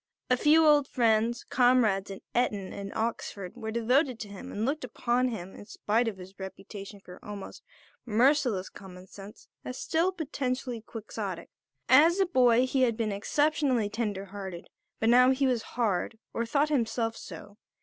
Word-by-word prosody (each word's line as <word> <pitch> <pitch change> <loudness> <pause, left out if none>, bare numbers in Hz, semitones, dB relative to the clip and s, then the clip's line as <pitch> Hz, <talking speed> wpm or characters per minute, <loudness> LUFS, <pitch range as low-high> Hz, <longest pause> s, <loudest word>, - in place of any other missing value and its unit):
A - - +6
few 315 +4 +5
old 295 -2 +5
friends, 230 0 +1
comrades 245 -6 +2
at 195 - -8
Eton 210 -6 0
and 200 0 -6
Oxford, 210 -4 -3
were 220 - -6
devoted 245 +3 +1
to 210 - -6
him 205 +7 -9
and 210 +2 -2
looked 290 +3 -1
upon 250 +1 0
him, 190 -6 -6
in 205 - -12
spite 225 +3 0
of 215 -4 -3
his 190 +1 -13
reputation 195 +1 -9
for 180 -2 -14
almost 205 -2 -8 0.4
merciless 240 -3 +2
common 185 -2 -12
sense, 200 +2 -13 0.2
as 255 - -6
still 335 +4 +1
potentially 265 -7 -3
Quixotic. 205 -5 -6 0.4
As 320 +8 +6
a 385 - +4
boy 250 -7 +4
he 260 +1 0
had 235 -3 +2
been 220 -3 -1
exceptionally 260 +1 +1
tender 210 -3 -3
hearted; 190 -3 -8 0.3
but 225 - +2
now 250 +1 +6
he 265 +1 +2
was 250 -3 +1 0.2
hard, 220 -1 0 0.2
or 230 0 -2
thought 290 +5 +2
himself 230 -4 0
so. 205 -2 -10
230 Hz, 165 wpm, -28 LUFS, 200-255 Hz, 0.4 s, A